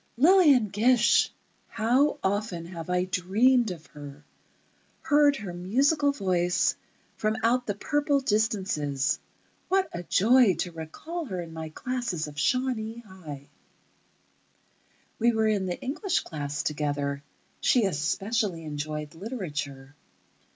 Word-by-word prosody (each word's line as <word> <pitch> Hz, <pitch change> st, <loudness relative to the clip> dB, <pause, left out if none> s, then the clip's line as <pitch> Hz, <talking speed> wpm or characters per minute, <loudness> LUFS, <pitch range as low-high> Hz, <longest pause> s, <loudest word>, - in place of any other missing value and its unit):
Lillian 295 Hz, -, +5 dB
Gish! 235 Hz, +4 st, +4 dB, 0.4 s
How 250 Hz, +7 st, +2 dB
often 195 Hz, -3 st, -1 dB
have 170 Hz, -1 st, -8 dB
I 180 Hz, 0 st, +1 dB
dreamed 215 Hz, +7 st, +2 dB
of 165 Hz, -4 st, -7 dB
her—heard 150 Hz, -, -2 dB
her 200 Hz, -8 st, -6 dB
musical 275 Hz, -, +2 dB
voice 180 Hz, -8 st, +1 dB, 0.4 s
from 215 Hz, 0 st, 0 dB
out 245 Hz, +2 st, +2 dB
the 205 Hz, -, -1 dB
purple 290 Hz, +5 st, +1 dB
distances. 190 Hz, -, 0 dB, 0.5 s
What 380 Hz, +1 st, +2 dB
a 175 Hz, -, -4 dB
joy 220 Hz, +3 st, +4 dB
to 180 Hz, -, -3 dB
recall 240 Hz, -, -6 dB
her 190 Hz, -8 st, -5 dB
in 165 Hz, -2 st, -7 dB
my 160 Hz, -1 st, -6 dB
classes 230 Hz, -3 st, -3 dB
of 150 Hz, 0 st, -8 dB
Shawnee 235 Hz, -, -1 dB
High. 160 Hz, -10 st, -10 dB, 1.7 s
We 235 Hz, +1 st, +3 dB
were 220 Hz, 0 st, +2 dB
in 205 Hz, -3 st, +1 dB
the 175 Hz, -, -3 dB
English 340 Hz, +8 st, -1 dB
class 145 Hz, -2 st, -4 dB
together. 145 Hz, -2 st, -2 dB, 0.4 s
She 245 Hz, -4 st, +3 dB
especially 195 Hz, -, -1 dB
enjoyed 150 Hz, 0 st, -5 dB
literature.... 145 Hz, -, -6 dB
195 Hz, 115 wpm, -27 LUFS, 160-250 Hz, 1.7 s, Lillian